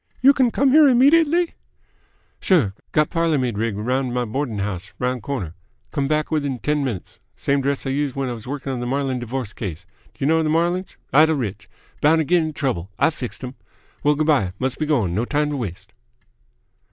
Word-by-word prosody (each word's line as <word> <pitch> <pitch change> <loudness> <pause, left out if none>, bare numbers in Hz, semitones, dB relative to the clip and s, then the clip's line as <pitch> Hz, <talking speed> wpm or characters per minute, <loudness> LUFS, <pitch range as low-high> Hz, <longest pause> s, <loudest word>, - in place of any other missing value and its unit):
"You 275 +2 +8
can 260 -3 +3
come 270 +3 +2
here 305 +1 +7
immediately?" 320 +6 +4 0.9
"Sure. 145 - +2 0.2
Got 150 -1 +2
parlour 165 -2 +1
maid 125 -4 -1
rig 110 -1 -1
round 125 +3 -1
at - - +2
m' 110 - -7
boarding 130 -4 -2
house 100 -2 -4
round 125 -1 -1
corner. 105 - -4 0.4
Come 140 -1 -1
back 155 +1 0
with 155 -2 +1
it - - -1
'n 130 - -3
ten 150 +3 0
minutes. 115 -9 -5 0.2
Same 140 0 0
dress 140 0 -1
I 135 - -1
used 140 -1 -1
when 135 0 -1
I - - -2
w's 115 -2 -8
working 140 0 -4
on 125 - -3
th' 120 - -3
Marling 135 -1 -1
D'vorce 120 -2 -4
case. 85 -7 -6 0.3
D'jer - - -3
know 160 +2 +3
th' 155 - 0
Marlings? 175 +4 0 0.2
Idle 155 +3 +6
rich! 105 -7 -4 0.3
Bound 155 +2 +5
t' 160 - +1
get 175 +3 +3
'nto 155 -2 -3
trouble. 120 - -2
I - - +3
fixed 135 -4 -7
'm. 125 0 -5 0.5
Well, 150 0 +3
g'bye. 145 - +2
Mus' 130 +3 -1
be 155 - -3
going. 115 - +1
No 105 +6 0
time 150 +2 0
t' - - -2
waste." 105 -10 -6
140 Hz, 215 wpm, -22 LUFS, 120-155 Hz, 0.9 s, You